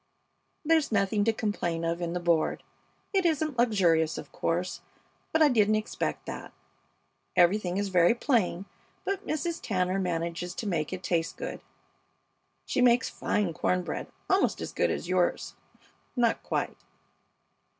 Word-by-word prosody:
There's 320 -3 +3
nothing 205 0 +2
to 225 - +4
complain 205 -7 -2
of 170 +1 -1
in 170 -1 -2
the 180 - -1
board. 170 -2 +1 0.5
It 385 -1 +3
isn't 310 -5 0
luxurious, 170 -9 +3
of - - -8
course, 175 +2 -2 0.5
but 320 0 +4
I - - +7
didn't 215 -5 +3
expect 215 0 -2
that. - - -7 0.8
Everything 180 +1 +3
is 200 0 -1
very 180 +3 +4
plain, 210 - +1 0.4
but 395 +1 -2
Mrs. 325 +2 -2
Tanner 185 -2 0
manages 175 0 -2
to - - -4
make 165 -7 -1
it 185 -1 -5
taste 165 -2 -1
good. - - -5 1.0
She 255 - 0
makes 245 0 +4
fine 200 -5 -1
corn 180 +3 0
bread, - - -4 0.2
almost 380 +1 +2
as - - -5
good - - +1
as - - -3
yours 180 -1 0 0.6
not 240 -2 +2
quite. - - -2
195 Hz, 145 wpm, -28 LUFS, 175-240 Hz, 1.0 s, I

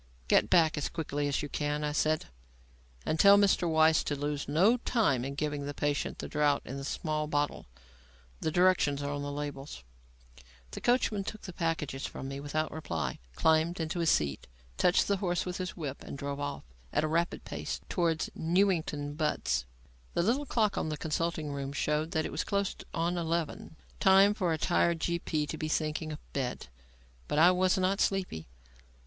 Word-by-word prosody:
"Get - - +4
back 160 -3 +4
as 145 - -2
quickly 145 -3 -2
as 140 0 -1
you - - -3
can," 150 +1 -2
I 150 - 0
said, 155 +1 +1 0.8
"and 155 - -1
tell 200 0 +8
Mr. 195 -4 +3
Weiss 160 0 +4
to 145 - -1
lose 145 0 -3
no 185 - +4
time 215 - +1
in 140 +1 -4
giving 145 -1 -2
the 145 - -5
patient 145 0 -1
the - - -5
draught 150 -1 +1
in 135 - -6
the 135 - -6
small 155 +1 -2
bottle. 145 - -1 0.7
The - - -1
directions 170 -5 +3
are 145 - -2
on 145 - -3
the 145 0 -4
labels." 145 - -6 0.9
The - - -7
coachman 240 -5 +2
took 215 +2 -6
the 180 - -7
packages 160 -6 -2
from 135 - -7
me 135 0 -5
without 155 +2 -2
reply, 80 - -3 0.2
climbed 160 +2 +3
to 165 +1 -3
his 165 -1 +2
seat, 70 -2 +1 0.3
touched 180 - +3
the 200 - +2
horse 175 -2 -1
with 180 -1 -4
his 185 0 -5
whip 145 -5 -5
and - - -7
drove 140 0 -4
off 145 0 -4 0.3
at - - +1
a - - +1
rapid 170 +3 -1
pace - - -4
towards 165 -3 0
Newington 165 -5 +1
Butts. 150 - 0 0.5
The - - +2
little 260 +9 +1
clock 215 -5 +1
in 160 - -1
the 150 - -3
consulting 160 -1 -2
room 140 -1 -4
showed 150 +2 0
that 160 -3 0
it - - -4
was - - -1
close 200 -1 -1 0.2
on 170 +2 -1
eleven; 165 -1 -2 0.2
time 195 +2 +6
for 185 -5 0
a 160 - +1
tired 170 0 +2
G.P. 165 -3 -1
to 155 - -5
be 155 - -2
thinking 155 0 -1
of 150 - -10
bed. 125 - -3 0.6
But - - -1
I 170 +4 +7
was 185 +1 +2
not 190 +2 +1
sleepy. 185 - -1
155 Hz, 190 wpm, -30 LUFS, 145-175 Hz, 0.9 s, tell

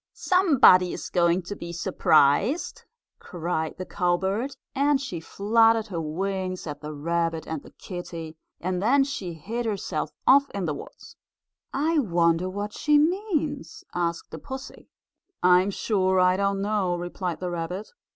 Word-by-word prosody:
"Somebody 280 - +5
is - - -6
going 175 0 +2
to 205 +4 -6
be 170 -3 -7
surprised!" 170 - +2 0.4
cried 165 -3 -3
the 185 - -5
cowbird 190 +9 -1 0.2
and 280 0 +2
she 225 -11 -5
fluttered 225 +5 +3
her 170 -4 -3
wings 185 +3 -3
at 150 -2 -6
the 150 0 -6
rabbit 165 +2 -1
and 160 -3 -4
the - - -14
kittie, 170 -3 -8 0.2
and 180 +1 -2
then 270 +7 +4
she 205 -10 -4
hid 225 +9 -4
herself 190 -7 -3
off 280 +1 +5
in 195 -3 -2
the 155 - -1
woods. - - -11 0.6
"I 310 +3 +1
wonder 170 - +2
what 205 +2 -5
she 300 0 +3
means?" 310 - -1
asked 170 -1 -2
the - - -7
pussy. 265 -1 -9 0.5
"I'm 180 +2 +5
sure 190 -2 +1
I 180 0 +4
don't 195 0 0
know," 200 -4 0
replied 175 -1 -4
the 180 -1 -3
rabbit. 175 +4 -4
185 Hz, 150 wpm, -25 LUFS, 170-230 Hz, 0.6 s, Somebody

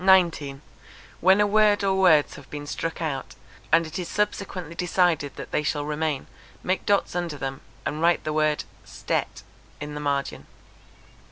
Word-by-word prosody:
When 190 +2 +5
a 210 - +5
word 210 0 +4
or 195 -1 +2
words 180 -6 +4
have 140 - -12
been 145 0 -6
struck 165 +3 -3
out, 140 -4 -4 0.4
and 165 0 +5
it 160 +4 -5
is 175 - -4
subsequently 195 -5 -2
decided 170 -5 +1
that - - -8
they - - +1
shall 145 -1 -1
remain, 150 -2 -1 0.4
make 185 +1 -1
dots 200 -3 +2
under 175 -4 -2
them, 135 0 -4 0.2
and 155 - -2
write 170 +1 +3
the 155 - -2
word 155 -1 +1 0.2
stet - - -3 0.4
in 150 0 -6
the 150 - -5
margin. 140 -1 -2
160 Hz, 160 wpm, -25 LUFS, 150-185 Hz, 0.4 s, When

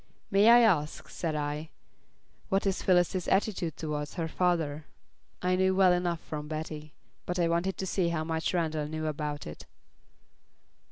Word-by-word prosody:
"May 200 +3 +6
I 240 +1 +8
ask," 165 -10 +1
said 160 -3 -3
I, 150 +1 -3 0.8
"what 195 +1 +1
is 195 -1 0
Phyllis's 180 0 +2
attitude 190 -5 0
towards 150 -2 -4
her 165 -2 -2
father?" 160 -4 0 0.6
I 180 0 +2
knew 190 0 +2
well 185 -2 +5
enough 175 -2 -1
from 150 -1 -6
Betty; 155 -1 -6 0.3
but 180 - -2
I 170 -1 +2
wanted 170 +3 0
to 190 - -3
see 185 -2 0
how 165 -2 -1
much 160 0 -1
Randall 160 -4 -1
knew 155 +1 -4
about 150 -1 -3
it. 75 - -9
165 Hz, 160 wpm, -29 LUFS, 155-185 Hz, 0.8 s, I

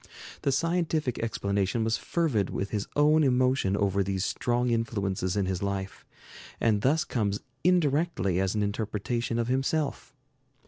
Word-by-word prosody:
The 140 - +1
scientific 160 -2 0
explanation 100 -1 -1
was 110 0 +1
fervid 140 - 0
with 100 - -3
his 105 -2 -2
own 150 +2 +4
emotion 125 -6 +2
over 100 -1 +1
these 95 0 -1
strong 120 0 0
influences 100 -5 -1
in 100 - +1
his 95 -1 -2
life, 100 -1 -4 0.5
and 110 -3 +2
thus 150 +8 +2
comes 105 -10 -1 0.2
indirectly 150 - +2
as 95 +1 0
an 105 - +1
interpretation 110 +3 -2
of 115 -1 0
himself. 135 +3 -1
115 Hz, 140 wpm, -28 LUFS, 100-135 Hz, 0.5 s, own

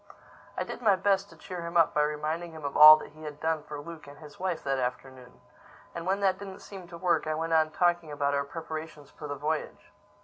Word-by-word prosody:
I - - 0
did - - -8
my 210 -4 +4
best 195 +1 +1
to - - -16
cheer 180 -2 -7
him 170 0 -3
up 165 - +4
by 150 - +2
reminding 155 +3 -2
him 155 -2 -9
of 140 - -4
all 155 +1 +11
he 155 0 -12
had 150 -1 -8
done 160 -1 -1
for 150 0 -8
Luke 160 0 -10
and 145 0 -12
his 150 -2 -14
wife 185 -3 -2
that 135 -1 -1
afternoon. 125 0 -6 0.5
And 170 +1 -6
when 195 +2 0
that 190 -1 +2
didn't 195 -1 -9
seem 190 -3 -10
to 170 - -10
work, 175 -2 +1
I 155 - -1
went 165 +1 -2
on 160 -1 +4
talking 175 -1 0
about 145 -1 -1
our 140 0 +1
preparations 155 0 -8
for 150 - -9
the 145 - -4
voyage. 155 +7 -4
160 Hz, 235 wpm, -28 LUFS, 150-175 Hz, 0.5 s, all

